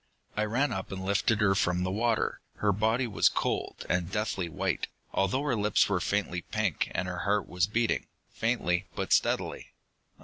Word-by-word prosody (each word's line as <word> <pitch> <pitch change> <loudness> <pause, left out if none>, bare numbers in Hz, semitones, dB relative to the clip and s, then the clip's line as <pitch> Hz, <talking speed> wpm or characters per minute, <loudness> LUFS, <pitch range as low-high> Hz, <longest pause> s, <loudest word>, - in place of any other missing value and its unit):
"I 105 - +1
ran 125 +7 +1
up 95 +1 -4
and 95 -1 -5
lifted 100 +2 +2
her 95 -2 +5
from 90 -2 +1
the 95 - -1
water. 115 +2 0
Her 105 - +2
body 110 +5 +1
was 110 -4 +3
cold, - - -2
and 90 0 0
deathly 100 -4 -1
white, - - -1 0.3
although 100 +9 +1
her 145 -4 +1
lips 105 -1 +3
were 100 -3 +1
faintly 90 -1 -1
pink, 105 -3 -1
and 90 +1 0
her 90 -1 -4
heart 100 +3 +1
was 90 0 +1
beating, 115 +2 0 0.3
faintly 100 -6 0
but - - 0
steadily. - - 0
100 Hz, 175 wpm, -29 LUFS, 90-110 Hz, 0.3 s, her